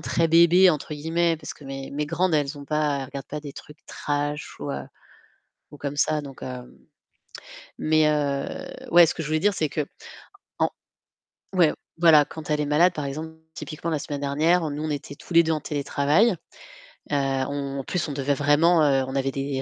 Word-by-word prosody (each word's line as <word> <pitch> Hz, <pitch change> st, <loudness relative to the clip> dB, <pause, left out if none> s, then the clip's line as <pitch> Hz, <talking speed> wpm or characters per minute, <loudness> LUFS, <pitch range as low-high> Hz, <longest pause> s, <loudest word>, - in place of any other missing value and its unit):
très 165 Hz, -1 st, 0 dB
bébé, 170 Hz, +3 st, +6 dB
entre 150 Hz, -1 st, -3 dB
guillemets, 165 Hz, +3 st, 0 dB
parce 150 Hz, -1 st, -8 dB
que 145 Hz, -, -16 dB
mes 135 Hz, 0 st, -7 dB
mes 150 Hz, +1 st, -2 dB
grandes, 170 Hz, +3 st, 0 dB
elles 145 Hz, 0 st, -1 dB
ont 140 Hz, -, -9 dB
pas 150 Hz, -1 st, 0 dB
elles -, -, -4 dB
regardent 140 Hz, 0 st, -8 dB
pas 150 Hz, -, -5 dB
des 145 Hz, -2 st, -8 dB
trucs 150 Hz, +4 st, -13 dB
trash 145 Hz, +1 st, -3 dB
ou, -, -, -4 dB
heu, 70 Hz, -, -4 dB, 0.9 s
ou -, -, -11 dB
comme 140 Hz, 0 st, -4 dB
ça. 155 Hz, +1 st, +1 dB
Donc, 140 Hz, -2 st, -11 dB
hem 125 Hz, -1 st, -8 dB, 1.0 s
mais, 155 Hz, 0 st, +3 dB
heu 140 Hz, -2 st, -2 dB, 0.2 s
ouais, 170 Hz, 0 st, +8 dB
ce -, -, -2 dB
que 165 Hz, -, -4 dB
je 150 Hz, -, -5 dB
voulais 155 Hz, +1 st, +1 dB
dire, 205 Hz, +2 st, +2 dB
c'est 155 Hz, -4 st, 0 dB
que, 150 Hz, 0 st, -2 dB, 0.7 s
en -, -, +2 dB, 0.8 s
ouais, 175 Hz, -5 st, +4 dB, 0.3 s
voilà, 160 Hz, -3 st, +6 dB
quand 155 Hz, 0 st, -10 dB
elle 150 Hz, 0 st, +1 dB
est -, -, 0 dB
malade 155 Hz, +5 st, +4 dB
par 150 Hz, -3 st, -4 dB
exemple, 155 Hz, +4 st, -5 dB, 0.2 s
typiquement 160 Hz, +1 st, -6 dB
la 155 Hz, -2 st, -1 dB
semaine 145 Hz, 0 st, -5 dB
dernière, 160 Hz, +5 st, +2 dB
heu, -, -, -3 dB
nous 150 Hz, +1 st, -4 dB
on 155 Hz, -, -2 dB
était 145 Hz, -1 st, -5 dB
tous 175 Hz, -, -11 dB
les 170 Hz, 0 st, +7 dB
2 160 Hz, 0 st, 0 dB
en 155 Hz, -, -2 dB
télétravail. 145 Hz, +8 st, +2 dB, 0.8 s
Heu, -, -, +1 dB, 0.3 s
on 140 Hz, -1 st, -3 dB
en -, -, -4 dB
plus, 180 Hz, +6 st, -2 dB
on -, -, -4 dB
devait 140 Hz, 0 st, 0 dB
vraiment, 155 Hz, +4 st, +4 dB
heu, 135 Hz, -2 st, +3 dB
on 130 Hz, -, -5 dB
avait 135 Hz, 0 st, 0 dB
des 135 Hz, 0 st, -3 dB
150 Hz, 210 wpm, -24 LUFS, 140-160 Hz, 1.0 s, ouais